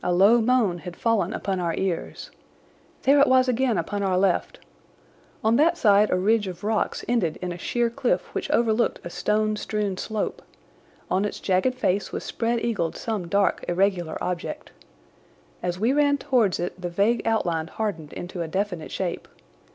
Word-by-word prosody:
A 180 - 0
low 200 +7 +5
moan 225 -7 +2
had 175 +2 -8
fallen 220 -5 +1
upon 195 -3 -2
our 170 -2 -1
ears. 185 -3 -3 0.7
There 280 +2 +5
it 280 - +6
was 260 0 +4
again 250 -3 +1
upon 200 +5 -2
our 190 -2 +1
left! 185 -1 +1 0.9
On 225 +2 +3
that 335 +3 +3
side 210 -4 +4
a - - +2
ridge 210 +2 +2
of 180 0 -7
rocks 215 +1 -1
ended 220 -10 0
in 180 -1 -4
a 175 - -5
sheer 235 +4 0
cliff 255 0 -1
which - - -3
overlooked 230 0 +2
a 175 - -7
stone 215 +2 0
strewn 210 -3 -2
slope. 215 +1 -3 0.7
On 190 +2 +2
its 210 - -3
jagged 190 +7 +1
face 205 -6 0
was - - -4
spread 235 0 -1
eagled 200 -9 -1
some 215 -6 -3
dark, 200 +2 +1
irregular 175 -2 0
object. 180 -1 -4 0.9
As 180 0 -2
we 230 +6 +2
ran 285 0 +3
towards 250 -9 +1
it 175 +1 -4
the 175 - -3
vague 205 +6 +1
outline 170 -8 0
hardened 165 -6 -4
into 175 0 -6
a 165 - -2
definite 180 -1 -3
shape. 185 -3 -3
205 Hz, 175 wpm, -25 LUFS, 180-230 Hz, 0.9 s, it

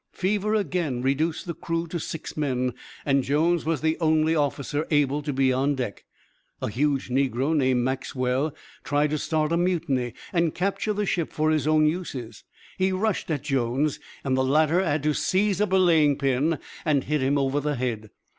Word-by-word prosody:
Fever 210 +3 0
again 155 - -1
reduced 155 +5 0
the 170 - -3
crew 165 +1 -3
to 170 - -3
six 160 +1 -6
men, 130 -4 -1 0.3
and 135 -1 +2
Jones 160 +5 +1
was 160 -1 0
the 160 0 0
only 160 0 +3
officer 145 0 -1
able 145 -1 +2
to 145 0 -3
be 130 -1 +2
on 140 +3 +1
deck. 125 -7 -5 0.5
A - - -2
huge 140 +2 0
negro 135 +3 +1
named 130 -4 +2
Maxwell 130 +2 -1 0.3
tried 145 0 +1
to 155 - 0
start 155 0 0
a 170 - +2
mutiny 160 -9 0 0.2
and 170 -3 +1
capture 200 +3 -1
the 210 0 -1
ship 170 -4 -1
for 155 +1 +1
his 155 -2 +1
own 155 0 +4
uses. 150 -8 -3 0.4
He 190 0 +2
rushed 195 +1 -1
at 150 -4 -1
Jones, 135 +1 0 0.2
and 135 -2 +1
the 130 - +2
latter 155 +6 +3
had 150 -4 0
to 150 0 +2
seize 200 +4 +1
a 210 - +3
belaying 165 -7 +4
pin 140 +4 +1 0.3
and 145 -4 +2
hit 150 -1 -1
him 135 +2 +2
over 135 +1 +1
the 145 0 -1
head. 115 -4 -3
150 Hz, 185 wpm, -25 LUFS, 135-165 Hz, 0.5 s, own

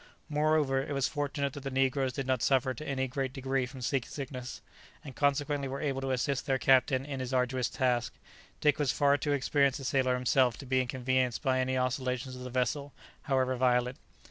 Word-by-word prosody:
Moreover, 150 -3 +2
it 145 - -4
was 135 -2 +1
fortunate 145 -2 -2
that - - -6
the 135 - -4
negroes 135 0 +1
did 135 +2 -4
not 130 -2 0
suffer 130 +3 +2
to 155 +4 -8
any 130 -1 -1
great 130 0 -3
degree 135 -1 -1
from 130 -1 -9
sea 135 +3 +1
sickness, 130 -1 -7 0.4
and 135 -5 -9
consequently 140 0 +1
were 135 +1 -4
able 135 -3 -2
to 135 - -3
assist 130 +1 -1
their 135 -1 +2
captain 130 0 +3
in 140 -2 -5
his 130 0 -3
arduous 125 -1 +1
task, 125 -3 0 0.5
Dick 150 0 +3
was 145 -3 +2
far 140 0 +3
too 145 +1 -2
experienced 140 0 +2
a - - -8
sailor 130 -1 +1
himself 125 -1 +2
to 140 - -9
be 130 0 +2
inconvenienced 130 -1 0
by 130 -2 +2
any 130 0 0
oscillations 130 0 -1
of 125 - -9
the 125 - -6
vessel, 130 +3 -1 0.3
however 130 -3 +1
violent. 125 0 +1
130 Hz, 200 wpm, -30 LUFS, 130-140 Hz, 0.5 s, captain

